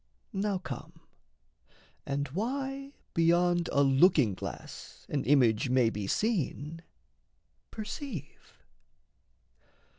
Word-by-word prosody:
Now 200 0 0
come, 165 -2 -8 1.1
and 140 +1 -1
why 270 - -3 0.2
beyond 175 +1 +3
a 140 - +4
looking 135 - +5
glass - - -8
An 145 -2 -1
image 125 -4 +4
may 125 -3 +4
be 105 -3 -4
seen, 165 - -1 0.9
perceive. 215 - -7
165 Hz, 85 wpm, -30 LUFS, 135-205 Hz, 1.1 s, looking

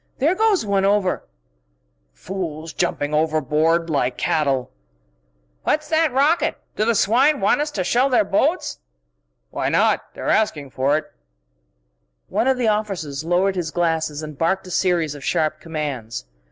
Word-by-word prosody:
There 305 +7 +2
goes 410 - +2
one 200 -1 +1
over_!..." 195 -1 +1 0.5
"... - - -46 0.3
fools 160 - -6
jumping 145 +1 -1
overboard 155 +2 +1
like 140 -5 0
cattle...." 135 -5 0 0.9
"What's 305 0 0
that 320 -2 +2
rocket? 285 +6 +2 0.2
Do 215 - +1
the 235 0 +2
swine 260 +9 +3
want 200 +8 +2
us 300 - -1
to 205 -10 -2
shell 250 +8 +2
their 250 -4 +4
boats?" 290 - 0 0.7
"Why - - -1
not? - - +3
They're - - -6
asking 150 -11 +1
for 135 +4 +1
it!" 155 - -4 1.2
One 245 - 0
of 265 -1 +3
the 245 -2 0
officers 195 -10 -2
lowered 180 +3 +1
his 175 -3 -2
glasses 160 -2 -1
and 155 -1 -7
barked 190 +4 +1
a 185 - -9
series 170 -5 +1
of 145 -2 -10
sharp 155 0 0
commands. 145 - -5
175 Hz, 155 wpm, -21 LUFS, 155-220 Hz, 1.2 s, their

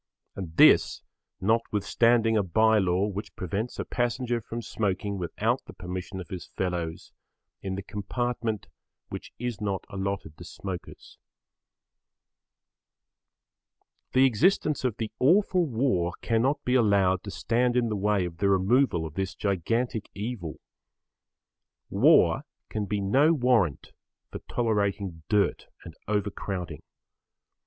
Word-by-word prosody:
And 85 -5 -7
this, - - +6 0.4
notwithstanding 115 +2 +2
a 105 - +4
bye 110 +4 +3
law 95 0 +2
which 105 -1 -5
prevents 100 +7 -3
a - - -3
passenger 120 0 -1
from 115 +2 -6
smoking 100 -2 -2
without 85 -2 -1
the - - -11
permission 90 +1 -6
of 90 - -8
his 95 -4 -6
fellows 85 -3 -4 0.5
in 95 -1 -3
the 100 - -5
compartment 110 +2 -3 0.4
which - - -7
is 120 -3 -4
not 100 -2 -2
allotted 100 -5 -4
to - - -8
smokers. 95 -3 -8 2.9
The 130 +1 +6
existence 145 - +2
of 120 -4 -1
the 110 -2 -3
awful 180 +4 +3
war 110 -9 0
cannot 130 +6 +1
be 125 - +1
allowed 100 -6 +3
to - - -5
stand 120 +4 +1
in 120 -2 +2
the 105 - -1
way 100 -1 +1
of 85 -1 -7
the 100 +1 +2
removal 95 -1 +3
of 80 - -7
this 95 +3 -3
gigantic 105 +4 -1
evil. 100 -6 -5 1.3
War - - +5 0.3
can 105 -1 -2
be 105 0 -1
no 135 +11 +4
warrant 120 - +1 0.4
for - - -6
tolerating 100 -6 -1
dirt 105 -2 +1 0.2
and 85 - -9
overcrowding. 100 -3 -3
105 Hz, 125 wpm, -27 LUFS, 95-120 Hz, 2.9 s, this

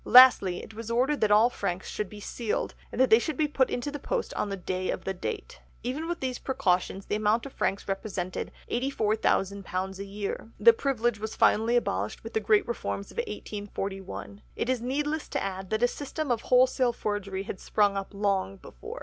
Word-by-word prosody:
Lastly, 245 -8 +7
it 220 - -11
was 230 +1 -7
ordered 260 +5 +1
that 215 - +4
all 215 +4 +6
franks 185 -5 -3
should 210 -3 -3
be 210 - -10
sealed 220 +1 -2 0.2
and - - -6
that 260 - +4
they 220 - +9
should 300 +3 -3
be 310 - +2
put 270 -3 +2
into 245 +4 -2
the 290 - -5
post 470 - -2
on 210 - -1
the 195 - -3
day 185 0 -3
of - - -2
the 195 - -2
date. 405 - -5 0.2
Even 280 +7 -2
with 345 0 -3
these 255 -2 -2
precautions 190 -5 0
the - - -3
amount 215 +3 +2
of 275 - -8
franks 195 - -1
represented 195 -2 -3 0.2
£84,000 200 -6 0
a - - -3
year. 200 +2 -5
The 230 +2 +8
privilege 240 -3 0
was 220 +1 -4
finally 225 +3 +4
abolished 105 - -1
with 225 - -8
the - - +2
great 210 0 +3
reforms 215 -4 -3
of - - -16
1841. 205 - -5
It - - -2
is 255 -2 +1
needless 295 +5 -1
to - - -1
add 190 -1 -4
that 215 +2 0
a - - +7
system 285 +2 -4
of 230 -2 +1
wholesale 255 -1 +4
forgery 200 -3 -3
had 195 - -6
sprung 205 -2 +2
up 195 -1 -4
long 200 - 0
before." - - -9
215 Hz, 200 wpm, -28 LUFS, 195-255 Hz, 0.2 s, they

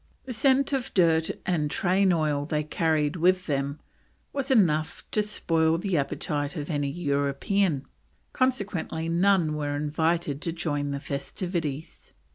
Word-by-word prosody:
The 255 - -5
scent 270 +3 +3
of 265 -3 -1
dirt 165 -3 +4 0.2
and 160 -5 0
train 185 +4 +2
oil 150 -4 +1
they 150 -1 0
carried 155 -1 0
with 185 +2 +3
them 140 0 -2 0.5
was 275 -1 -2
"enough 165 - +2
to 215 - +2
spoil 165 -6 +1
the 185 +1 -1
appetite 145 +1 -1
of 150 0 -4
any 145 -2 0
European," 145 +2 0 0.5
consequently 200 - -1
none 175 -2 +3
were 145 -1 -2
invited 150 0 0
to 165 - -2
join 150 -4 -2
the 140 0 -3
festivities. 155 +2 -5
160 Hz, 135 wpm, -27 LUFS, 145-185 Hz, 0.5 s, dirt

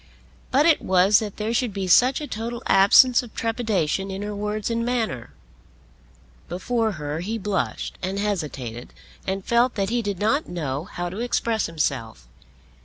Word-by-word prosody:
But 280 +3 +3
it 330 -2 +4
was 190 +2 +4
that 210 -3 -6
there 220 +2 -2
should 240 -1 0
be 195 -1 -3
such 250 +9 +5
a - - -3
total 235 -1 -5
absence 225 +6 +6
of 240 -3 -13
trepidation 215 -6 -1
in 195 +1 -5
her 210 0 -4
words 210 +2 -3
and 230 0 0
manner. 225 - -2 1.2
Before 220 +4 -1
her 150 -2 -4
he 210 +6 -3
blushed 205 -2 -3
and 190 +2 -3
hesitated 150 - -4 0.3
and 195 0 -2
felt 240 +2 +2
that 200 0 -1
he 240 0 +1
did 200 -3 -3
not 225 - 0
know 150 -4 -3
how 175 -2 -5
to 190 +5 -7
express 230 -2 0
himself. 125 - -3
205 Hz, 165 wpm, -24 LUFS, 175-230 Hz, 1.2 s, absence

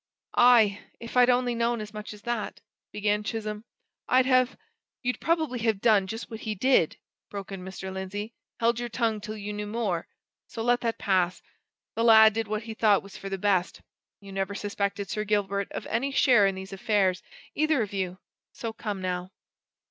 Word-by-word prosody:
"Aye! 225 -5 +6 0.2
if 230 +1 -9
I'd 250 0 +6
only 245 0 +2
known 235 0 0
as 215 0 -7
much 210 0 -7
as 210 -1 -12
that," 240 -2 -3 0.3
began 210 0 0
Chisholm, 215 0 -4 0.4
"I'd 255 0 +5
have 255 -1 +3 0.2
" - - -65
"You'd 250 0 -1
probably 315 -7 0
have 220 -3 +1
done 205 -4 +4
just 225 +4 -6
what 220 - -6
he 220 -2 -3
did!" 250 - +3 0.3
broke 200 -1 -7
in 190 -2 -6
Mr. 190 0 -7
Lindsey 205 +4 -5 0.3
"held 235 0 +2
your 240 0 -3
tongue 225 -2 0
till 215 +1 -6
you 210 0 -5
knew 210 0 -4
more! 205 -6 -2 0.4
so 225 - -5
let 245 +1 +2
that 230 -1 -1
pass 185 -2 +1 0.5
the 230 - -1
lad 220 -2 +8
did 225 0 -2
what 215 +1 -2
he 225 0 -6
thought 215 -2 +3
was 200 -1 -12
for 195 - -7
the 195 - -2
best. 190 -2 0 0.4
You 200 -1 -12
never 195 +1 -2
suspected 200 0 -2
Sir 210 +2 -2
Gilbert 200 -1 0
of - - -5
any 235 +5 -1
share 245 -7 +5
in 195 - -1
these 190 +1 -8
affairs, 195 -3 +1 0.3
either 310 -5 +2
of 205 - -7
you 185 -2 -2 0.4
so 230 -1 -5
come, 205 -4 -5
now!" 180 0 -2
210 Hz, 195 wpm, -27 LUFS, 195-235 Hz, 0.5 s, lad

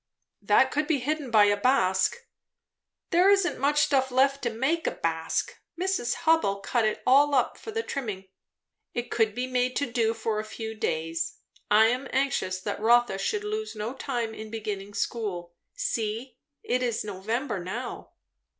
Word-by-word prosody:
"That 210 +6 +4
could 300 +1 0
be 315 -2 +2
hidden 290 +1 -2
by 215 -2 +6
a 205 0 +3
basque." 205 - +2 1.0
"There 360 +3 +5
isn't 395 -3 +3
much 290 +2 +3
stuff 265 -2 +2
left 270 +2 +2
to 240 - 0
make 270 +9 0
a - - +1
basque. 165 0 -2 0.2
Miss 380 +2 0 0.2
Hubbell 320 -12 +3
cut 240 -3 +1
it 215 - -1
all 280 +3 +5
up 255 -2 +2
for - - -10
the 450 +1 -2
trimming." 210 - -5 0.7
"It 240 0 -3
could 220 -2 +1
be 250 - -1
made 255 0 0
to 285 - +1
do 230 -1 +1
for 220 -1 -2
a - - -2
few 220 +1 -6
days. 165 -5 -2 0.3
I 215 +1 +6
am 250 +4 0
anxious 260 -8 0
that 205 +1 -3
Rotha 235 -2 +3
should 420 - -1
lose 430 - -4
no 215 +3 -4
time 240 -4 -3
in 220 0 -8
beginning 205 -2 -5
school. 180 -7 -3 0.2
See, 235 - -3 0.2
it 250 +1 0
is 240 -3 -1
November 210 +4 -3
now." 240 +8 -6
240 Hz, 170 wpm, -27 LUFS, 210-275 Hz, 1.0 s, by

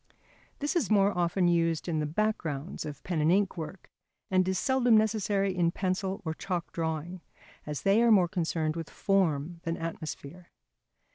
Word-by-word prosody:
This 295 +5 -2
is 315 - +1
more 200 -1 +4
often 175 +1 +1
used 165 -1 +1
in 160 -3 0
the 150 - -1
backgrounds 165 -5 -2
of 145 -1 -8
pen 170 -4 -1
and 155 +2 +3
ink 195 +1 +2
work 165 +2 -8 0.4
and 185 -1 +3
is 190 0 0
seldom 245 0 +3
necessary 205 -3 +1
in 175 -2 +2
pencil 190 +2 -2
or 160 - -1
chalk 175 +1 -4
drawing, 165 +2 -3 0.5
as 150 -1 -4
they 200 +3 +4
are 235 - +4
more 195 -5 +6
concerned 165 -2 -1
with 165 -2 -5
form 170 -4 0
than 165 0 -3
atmosphere. 165 +1 -6
175 Hz, 165 wpm, -29 LUFS, 160-195 Hz, 0.5 s, more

